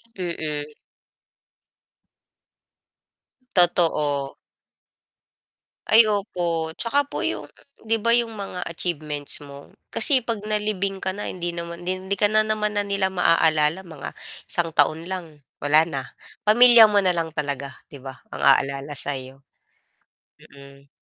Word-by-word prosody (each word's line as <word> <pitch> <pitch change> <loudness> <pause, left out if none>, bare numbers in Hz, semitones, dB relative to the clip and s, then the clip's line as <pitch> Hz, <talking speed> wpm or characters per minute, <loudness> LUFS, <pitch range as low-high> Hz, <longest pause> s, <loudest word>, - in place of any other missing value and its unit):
M 185 - -4
mhm. 150 -3 -4 2.9
Totoo. 150 -6 +2 1.5
Ay 225 +2 +8
opo, 175 -6 -2
'tsaka 280 +4 0
po - - -4
'yong, - - -3 0.4
'di 225 - +2
ba 235 - +3
'yong 235 -2 +2
mga 195 -3 -6
achievements 155 -4 -3
mo? 140 -1 -12 0.2
Kasi 265 +4 +2
'pag 230 -4 -4
nalibing 210 -2 -2
ka 190 0 -3
na, 205 - -5
hindi 175 -1 -4
naman 170 +1 -7
'di 185 0 -2
hindi - - +3
ka 205 - +4
na 215 +1 +3
naman 215 -1 -1
na 205 - +1
nila 200 -1 0
maaalala; 165 -1 +2
mga 155 -4 -8 0.4
isang 165 -2 -2
taon 155 +3 +2
lang, 170 -5 -6 0.2
wala 155 +3 +4
na. 140 -5 -4 0.4
Pamilya 230 0 +7
mo 205 - +4
na 185 -3 +1
lang 165 -1 -2
talaga, 140 -3 -4
'di 140 -3 -13
ba, 135 -1 -9
ang - - -7
aalala 140 +1 +2
sa 145 - -2
iyo. 130 +1 -9 1.0
Mhm. 140 0 -16
175 Hz, 135 wpm, -23 LUFS, 150-205 Hz, 2.9 s, Ay